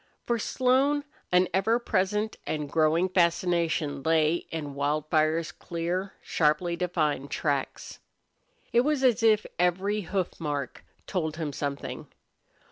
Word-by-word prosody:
For 235 Hz, -1 st, 0 dB
Slone 265 Hz, +5 st, +2 dB, 0.3 s
an 180 Hz, 0 st, +4 dB
ever 195 Hz, +5 st, +3 dB
present 210 Hz, -1 st, 0 dB
and 150 Hz, -2 st, -2 dB
growing 160 Hz, +4 st, +2 dB
fascination 170 Hz, -4 st, +1 dB
lay 160 Hz, +2 st, +2 dB
in 150 Hz, -3 st, -5 dB
Wildfire's 155 Hz, +3 st, +1 dB
clear, 175 Hz, +3 st, -3 dB
sharply 160 Hz, +2 st, +1 dB
defined 155 Hz, -6 st, -1 dB
tracks. 140 Hz, -3 st, -2 dB, 0.7 s
It 235 Hz, -, +6 dB
was 290 Hz, 0 st, 0 dB
as 245 Hz, -3 st, +4 dB
if 220 Hz, -2 st, +4 dB
every 190 Hz, +4 st, +1 dB
hoof 190 Hz, -1 st, -3 dB
mark 145 Hz, -5 st, -4 dB, 0.2 s
told 160 Hz, -4 st, -2 dB
him 155 Hz, -4 st, -3 dB
something. 140 Hz, 0 st, -4 dB
170 Hz, 120 wpm, -27 LUFS, 155-200 Hz, 0.7 s, It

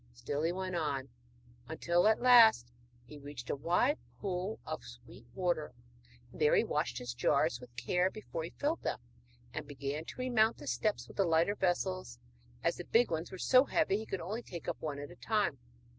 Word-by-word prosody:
Still 140 Hz, +5 st, -3 dB
he 165 Hz, +2 st, +1 dB
went 185 Hz, 0 st, -3 dB
on, 140 Hz, -5 st, -2 dB, 0.6 s
until 170 Hz, +3 st, +2 dB
at 220 Hz, 0 st, +4 dB
last 225 Hz, -, +7 dB, 0.3 s
he 150 Hz, +3 st, -11 dB
reached 140 Hz, -4 st, -7 dB
a -, -, 0 dB
wide 175 Hz, -, +2 dB, 0.2 s
pool 190 Hz, +1 st, -3 dB
of 155 Hz, -3 st, -5 dB
sweet 120 Hz, -1 st, -13 dB
water, 175 Hz, -7 st, -1 dB, 0.6 s
and -, -, -12 dB
there 150 Hz, -, +5 dB
he -, -, +4 dB
washed 150 Hz, -5 st, -1 dB
his 125 Hz, -1 st, -4 dB
jars 125 Hz, 0 st, +1 dB
with 120 Hz, -1 st, -13 dB
care 180 Hz, +10 st, +1 dB
before 190 Hz, -6 st, -6 dB
he 165 Hz, -, -5 dB
filled 300 Hz, -, -2 dB
them, -, -, -2 dB, 0.6 s
and -, -, -5 dB
began 140 Hz, +2 st, -4 dB
to -, -, -9 dB
remount 235 Hz, -3 st, +2 dB
the 145 Hz, -, -10 dB
steps 140 Hz, -, -1 dB
with -, -, -14 dB
the 195 Hz, -, +4 dB
lighter 165 Hz, +4 st, +3 dB
vessels, 185 Hz, -, -1 dB, 0.5 s
as -, -, +1 dB
the -, -, -7 dB
big 235 Hz, -2 st, +3 dB
ones 160 Hz, +1 st, -3 dB
were 190 Hz, -, -7 dB
so 255 Hz, +8 st, +5 dB
heavy 295 Hz, -, +2 dB
he 220 Hz, -, -6 dB
could 195 Hz, -, -3 dB
only 210 Hz, +7 st, -4 dB
take 175 Hz, -8 st, -9 dB
up -, -, -3 dB
one 150 Hz, -2 st, -3 dB
at 145 Hz, +3 st, -7 dB
a -, -, -12 dB
time. 210 Hz, -, 0 dB
170 Hz, 200 wpm, -33 LUFS, 140-205 Hz, 0.6 s, last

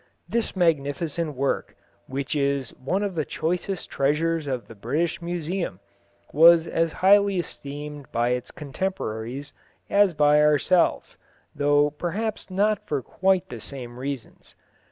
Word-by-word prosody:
This 235 Hz, -3 st, -1 dB
magnificent 160 Hz, -1 st, 0 dB
work, 135 Hz, +2 st, -1 dB, 0.3 s
which 135 Hz, +2 st, -3 dB
is 140 Hz, -3 st, 0 dB
one 185 Hz, +10 st, -2 dB
of 200 Hz, -2 st, -2 dB
the 160 Hz, -3 st, -1 dB
choicest 175 Hz, +5 st, -3 dB
treasures 155 Hz, +3 st, +1 dB
of 130 Hz, -3 st, -3 dB
the -, -, -11 dB
British 155 Hz, +11 st, -2 dB
Museum, 170 Hz, -, -3 dB, 0.5 s
was 165 Hz, +2 st, +7 dB
as 165 Hz, -1 st, 0 dB
highly 200 Hz, 0 st, +6 dB
esteemed 145 Hz, -4 st, -6 dB
by 120 Hz, +1 st, +1 dB
its 125 Hz, 0 st, -2 dB
contemporaries 140 Hz, -, -4 dB, 0.4 s
as 200 Hz, -4 st, +4 dB
by 150 Hz, 0 st, +5 dB
ourselves, 150 Hz, +4 st, +2 dB, 0.3 s
though 145 Hz, +1 st, +3 dB
perhaps 200 Hz, +8 st, -3 dB
not 205 Hz, +3 st, +1 dB
for 145 Hz, -4 st, -1 dB
quite 190 Hz, +3 st, +1 dB
the -, -, -7 dB
same 125 Hz, -3 st, -7 dB
reasons. 135 Hz, -3 st, -7 dB
150 Hz, 130 wpm, -25 LUFS, 140-175 Hz, 0.5 s, was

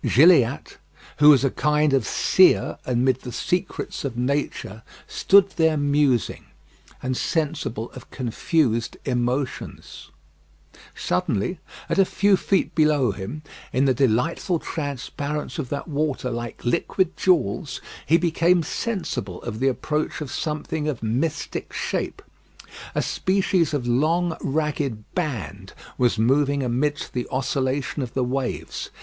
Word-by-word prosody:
Gilliatt, 140 Hz, -4 st, +4 dB, 0.4 s
who 150 Hz, +1 st, +7 dB
was 140 Hz, -3 st, +7 dB
a 135 Hz, -, +1 dB
kind 150 Hz, -1 st, +2 dB
of 130 Hz, -7 st, +2 dB
seer -, -, +4 dB
amid 125 Hz, +1 st, +2 dB
the 125 Hz, -, -7 dB
secrets 180 Hz, -, -2 dB
of 130 Hz, -4 st, -4 dB
nature, 125 Hz, -5 st, -2 dB, 0.2 s
stood 195 Hz, 0 st, +4 dB
there 160 Hz, -2 st, +3 dB
musing, 145 Hz, -, +1 dB, 0.6 s
and 130 Hz, 0 st, -1 dB
sensible 150 Hz, -8 st, -2 dB
of 130 Hz, -, -12 dB
confused 120 Hz, -1 st, 0 dB
emotions. 125 Hz, +1 st, -3 dB, 0.9 s
Suddenly, 100 Hz, -, -1 dB, 0.3 s
at -, -, 0 dB
a 195 Hz, -, +6 dB
few 200 Hz, +1 st, +3 dB
feet 195 Hz, +1 st, 0 dB
below 150 Hz, -7 st, +3 dB
him, 105 Hz, +11 st, -7 dB, 0.3 s
in 130 Hz, +2 st, +2 dB
the 130 Hz, -, +4 dB
delightful 135 Hz, -, +1 dB
transparence 145 Hz, +1 st, -4 dB
of 130 Hz, -5 st, -3 dB
that 145 Hz, -, -4 dB
water 145 Hz, -4 st, -1 dB
like 120 Hz, 0 st, -6 dB
liquid 175 Hz, +9 st, 0 dB
jewels, 150 Hz, -, +1 dB, 0.2 s
he 165 Hz, -, +4 dB
became 170 Hz, +1 st, +2 dB
sensible 170 Hz, -, -3 dB
of 110 Hz, -2 st, -5 dB
the 135 Hz, -, +2 dB
approach 150 Hz, +4 st, -1 dB
of 150 Hz, -4 st, -6 dB
something 155 Hz, 0 st, -3 dB
of 140 Hz, -7 st, -3 dB
mystic 125 Hz, +8 st, -2 dB
shape. -, -, -3 dB, 0.7 s
A -, -, +1 dB
species 185 Hz, -4 st, +1 dB
of 145 Hz, -5 st, -2 dB
long 160 Hz, +8 st, +1 dB
ragged 140 Hz, -6 st, -1 dB
band 110 Hz, -, -4 dB, 0.3 s
was 120 Hz, -3 st, +3 dB
moving 140 Hz, +4 st, +2 dB
amidst 130 Hz, +4 st, -1 dB
the 125 Hz, -1 st, -2 dB
oscillation 135 Hz, +2 st, -1 dB
of 125 Hz, -3 st, -5 dB
the 130 Hz, -, +1 dB
waves. 130 Hz, +1 st, -3 dB
140 Hz, 130 wpm, -23 LUFS, 125-155 Hz, 0.9 s, who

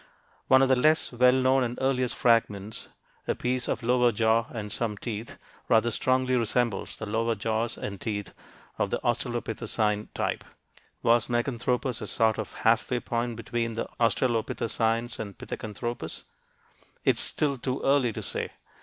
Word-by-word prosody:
One 130 Hz, 0 st, +6 dB
of 135 Hz, -, +3 dB
the 130 Hz, -, +6 dB
less 155 Hz, +5 st, +3 dB
well 125 Hz, +1 st, +5 dB
known 130 Hz, 0 st, +3 dB
and 120 Hz, 0 st, -3 dB
earliest 130 Hz, -2 st, +1 dB
fragments, 110 Hz, -3 st, +1 dB, 0.4 s
a -, -, +1 dB
piece 125 Hz, 0 st, -1 dB
of 115 Hz, -, -2 dB
lower 125 Hz, 0 st, +4 dB
jaw 115 Hz, +1 st, +2 dB
and 105 Hz, -3 st, -6 dB
some 105 Hz, -1 st, -2 dB
teeth, 110 Hz, +1 st, -5 dB, 0.3 s
rather 115 Hz, +1 st, +4 dB
strongly 130 Hz, +2 st, +2 dB
resembles 115 Hz, -2 st, 0 dB
the 110 Hz, -, -5 dB
lower 115 Hz, +2 st, 0 dB
jaws 110 Hz, +2 st, -1 dB
and 100 Hz, -2 st, -6 dB
teeth 105 Hz, -3 st, -4 dB, 0.5 s
of -, -, +1 dB
the -, -, 0 dB
australopithecine 115 Hz, -3 st, -1 dB
type. -, -, -1 dB, 0.6 s
Was 115 Hz, -1 st, +4 dB
Meganthropus 120 Hz, 0 st, -1 dB
a -, -, -4 dB
sort 110 Hz, -1 st, +2 dB
of 110 Hz, -, -4 dB
half 115 Hz, 0 st, +4 dB
way 125 Hz, -, +1 dB
point 120 Hz, 0 st, -2 dB
between 115 Hz, 0 st, -2 dB
the 115 Hz, -, -3 dB
australopithecines 115 Hz, 0 st, 0 dB
and 100 Hz, -2 st, -6 dB
Pithecanthropus? 110 Hz, -5 st, -5 dB, 0.8 s
It -, -, +4 dB
is -, -, 0 dB
still 140 Hz, -4 st, 0 dB
too 130 Hz, +2 st, -2 dB
early 135 Hz, -3 st, +3 dB
to -, -, -6 dB
say. -, -, -3 dB
120 Hz, 155 wpm, -27 LUFS, 110-125 Hz, 0.8 s, One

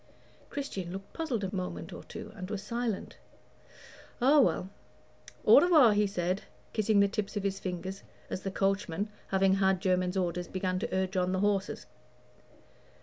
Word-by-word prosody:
Christian 195 Hz, -11 st, -4 dB
looked 195 Hz, +1 st, -8 dB
puzzled 275 Hz, -10 st, -2 dB
a 195 Hz, +1 st, -3 dB
moment 185 Hz, -1 st, -4 dB
or -, -, -8 dB
two, -, -, -9 dB
and 185 Hz, -3 st, -7 dB
was 205 Hz, -2 st, -4 dB
silent. 235 Hz, -3 st, -3 dB, 1.0 s
"Oh, 280 Hz, +4 st, +6 dB
well 190 Hz, -6 st, +1 dB, 0.7 s
au -, -, +9 dB
revoir," 305 Hz, -11 st, +6 dB
he 205 Hz, 0 st, +3 dB
said, 185 Hz, 0 st, -1 dB, 0.3 s
kissing 215 Hz, -2 st, +3 dB
the 200 Hz, -, +5 dB
tips 205 Hz, +1 st, -3 dB
of 200 Hz, -, -2 dB
his 195 Hz, -1 st, -1 dB
fingers 185 Hz, +1 st, -5 dB, 0.3 s
as 185 Hz, -, -4 dB
the 195 Hz, -, -3 dB
coachman, 195 Hz, 0 st, 0 dB, 0.2 s
having 190 Hz, 0 st, +3 dB
had 190 Hz, -1 st, +3 dB
Jermyn's 185 Hz, 0 st, +1 dB
order, 180 Hz, -1 st, 0 dB
began 185 Hz, 0 st, -2 dB
to -, -, -3 dB
urge 190 Hz, +1 st, -1 dB
on 180 Hz, 0 st, +1 dB
the 185 Hz, -, 0 dB
horses. 205 Hz, -1 st, 0 dB
195 Hz, 160 wpm, -30 LUFS, 185-210 Hz, 1.0 s, au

